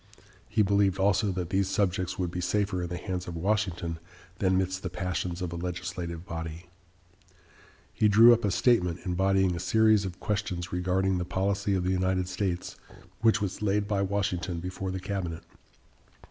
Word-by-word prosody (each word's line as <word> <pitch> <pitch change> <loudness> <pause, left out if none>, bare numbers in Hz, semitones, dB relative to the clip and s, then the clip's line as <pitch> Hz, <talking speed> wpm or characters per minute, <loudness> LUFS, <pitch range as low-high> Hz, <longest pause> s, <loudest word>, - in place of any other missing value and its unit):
He 105 - +3
believed 100 -1 +2
also 100 +1 +2
that 90 -1 -4
these 95 0 +1
subjects 95 -2 0
would 90 -2 -2
be 90 0 -3
safer 100 0 0
in 85 - -3
the 90 - -4
hands 90 -1 -4
of 85 - -5
Washington 90 -3 -1 0.4
than 95 -1 +2
midst 95 0 -1
the 90 - -3
passions 90 0 -3
of 85 -2 -3
a - - -4
legislative 90 -1 -5
body. 80 +1 -6 1.3
He 110 - +3
drew 115 +3 +8
up 120 - 0
a 105 - +2
statement, 95 -5 +2
embodying 95 0 +2
a - - -4
series 110 +3 +4
of 95 -2 -6
questions 90 -4 -3
regarding 90 +1 +1
the - - -1
policy 95 +2 0
of 90 - 0
the 90 - 0
United 95 0 +1
States, 90 -1 -3 0.4
which 110 -1 +3
was 100 -1 -3
laid 105 0 +1
by 100 -2 0
Washington 95 -3 -1
before 90 +2 -4
the 95 0 -3
cabinet. 95 -4 -4
95 Hz, 175 wpm, -28 LUFS, 90-100 Hz, 1.3 s, drew